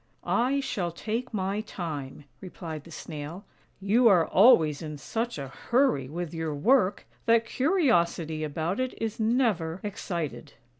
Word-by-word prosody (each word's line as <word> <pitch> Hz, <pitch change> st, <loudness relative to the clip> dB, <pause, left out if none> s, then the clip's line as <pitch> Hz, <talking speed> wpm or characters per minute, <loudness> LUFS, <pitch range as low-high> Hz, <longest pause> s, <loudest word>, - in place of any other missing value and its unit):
" -, -, -39 dB
" -, -, -41 dB, 0.2 s
I 280 Hz, +1 st, +1 dB
shall 180 Hz, -9 st, -2 dB
take 225 Hz, +8 st, -4 dB
my 200 Hz, -1 st, -1 dB
time," 150 Hz, -, -6 dB, 0.2 s
replied 165 Hz, -5 st, -7 dB
the 170 Hz, -, -13 dB
Snail. 160 Hz, +3 st, -7 dB, 0.2 s
" -, -, -38 dB
You 240 Hz, +1 st, +6 dB
are 180 Hz, -6 st, +5 dB
always 165 Hz, -, +5 dB
in 150 Hz, -2 st, -6 dB
such 225 Hz, +10 st, -3 dB
a 135 Hz, -2 st, -5 dB
hurry 235 Hz, -, +1 dB
with 170 Hz, +1 st, -5 dB
your 160 Hz, -2 st, -3 dB
work, 205 Hz, -, +2 dB, 0.2 s
that 230 Hz, 0 st, +4 dB
curiosity 175 Hz, -, +1 dB
about 160 Hz, -, -2 dB
it 255 Hz, 0 st, -3 dB
is 225 Hz, 0 st, -3 dB
never 220 Hz, -8 st, +1 dB
excited." 175 Hz, -6 st, -4 dB
180 Hz, 155 wpm, -27 LUFS, 160-230 Hz, 0.2 s, You